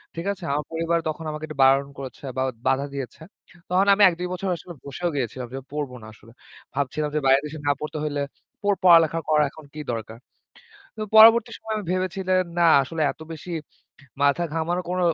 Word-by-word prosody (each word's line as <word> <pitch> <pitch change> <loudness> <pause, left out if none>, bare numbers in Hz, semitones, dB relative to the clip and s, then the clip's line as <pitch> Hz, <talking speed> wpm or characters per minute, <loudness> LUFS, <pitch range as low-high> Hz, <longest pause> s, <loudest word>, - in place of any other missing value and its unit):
ঠিক 165 +1 -5
আছে? 190 -2 -14
আমার 150 +1 -1
পরিবার 165 +1 0
তখন 155 +1 -5
আমাকে 155 +1 -5
একটু 155 -2 -9
বারণ 135 +1 +4
করেছে 135 0 -9
বা 130 - +1 0.2
বাধা 135 +1 +2
দিয়েছে। 135 0 -6 0.5
তখন 185 +2 +3
আমি 205 - +1
১-২ 180 0 -1
বছর 190 +1 -3
আসলে 175 - -10
বসেও 175 +6 -3
গিয়েছিলাম 125 -1 -3
যে 135 - -4
পড়ব 145 -3 -3
না - - -10
আসলে। 110 +1 -18 0.4
ভাবছিলাম 145 +2 -1
যে - - +3
বাইরের 135 +2 +5
দেশে 155 +1 -7
না - - +5
পড়তে 155 0 -4
হইলে 145 -1 -1 0.4
ওই 205 - +4
পড়ালেখা 165 -2 +6
করা 150 -1 +4
এখন 155 -1 -14
কি 155 - -8
দরকার? 110 0 -6 0.8
তো 215 - -7
পরবর্তী 225 +1 +8
সময়ে 220 0 -4
আমি 210 - -5
ভেবেছিলাম 185 0 0
না 170 - +5 0.2
আসলে 160 +4 -4
এত - - -18
বেশি 160 +3 -9 0.7
মাথা 140 +4 +3
ঘামানো 165 +2 -1
কোন 180 0 -1
155 Hz, 190 wpm, -24 LUFS, 140-180 Hz, 0.8 s, পরবর্তী